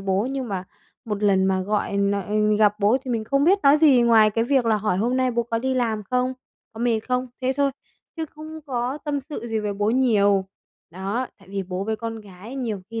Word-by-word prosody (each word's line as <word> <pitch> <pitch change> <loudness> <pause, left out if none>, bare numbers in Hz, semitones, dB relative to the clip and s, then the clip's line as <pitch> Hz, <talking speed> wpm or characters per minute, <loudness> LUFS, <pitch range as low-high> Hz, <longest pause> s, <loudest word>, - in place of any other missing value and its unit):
bố, 195 +3 0
nhưng 265 -3 -3
mà 185 -2 -3 0.4
một 210 -2 -4
lần 195 -2 +3
mà 190 0 +1
gọi 205 0 -1
n 205 +1 +1
gặp 210 -1 +4
bố 210 +5 +4
thì 255 - -4
mình 225 -2 -1
không 275 +4 +1
biết 380 +5 +5
nói 280 +2 +6
gì 285 -6 +5
ngoài 225 -2 +5
cái 225 +2 0
việc 265 0 +2
là 220 -1 +3
hỏi 210 -3 -1
hôm 240 +4 +1
nay 255 -1 +2
bố 235 0 0
có 230 0 -2
đi 260 +2 -1
làm 225 -4 0
không, 250 +1 +1 0.4
có 225 - -9
mệt 235 -2 +1
không, 250 0 0
thế 260 0 +1
thôi, 280 -1 +2 0.5
chứ 320 - -2
không 315 +1 -10
có 255 +1 -2
tâm 290 -2 -1
sự 270 -4 -7
gì 225 - -1
với 210 -1 -2
bố 205 +2 0
nhiều. 205 -6 +3 0.4
Đó, 195 +8 -3
tại 195 -2 -20
vì 195 0 -3
bố 185 +1 -4
với 220 +1 -2
con 225 0 -5
gái 205 +5 -11
nhiều 220 -7 -3
khi 230 0 -4
225 Hz, 235 wpm, -23 LUFS, 205-255 Hz, 0.5 s, nói